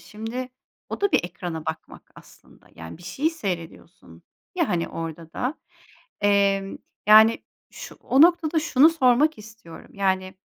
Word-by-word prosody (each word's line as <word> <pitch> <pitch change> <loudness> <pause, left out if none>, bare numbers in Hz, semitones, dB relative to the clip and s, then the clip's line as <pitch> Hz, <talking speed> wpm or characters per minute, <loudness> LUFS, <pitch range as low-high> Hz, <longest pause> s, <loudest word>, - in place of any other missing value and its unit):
Şimdi, 225 +4 -7 0.4
o - - -6
da 405 -1 +1
bir - - +2
ekrana 170 -2 -7
bakmak 160 0 -8
aslında. - - -19
Yani, 80 - -10
bir - - -16
şeyi 275 - -2
seyrediyorsun 185 - -8 0.3
ya, 340 -5 0
hani, 170 -1 -1
orada 165 0 -7
da, 255 +5 -3 0.7
emm, 200 -1 +1 0.3
yani, 220 +2 +6 0.3
şu - - -10
o 265 - +2
noktada 330 -1 +4
şunu 305 -2 +4
sormak 300 0 +2
istiyorum. 215 -5 -14
Yani, 190 -1 -1
210 Hz, 140 wpm, -23 LUFS, 175-275 Hz, 0.7 s, yani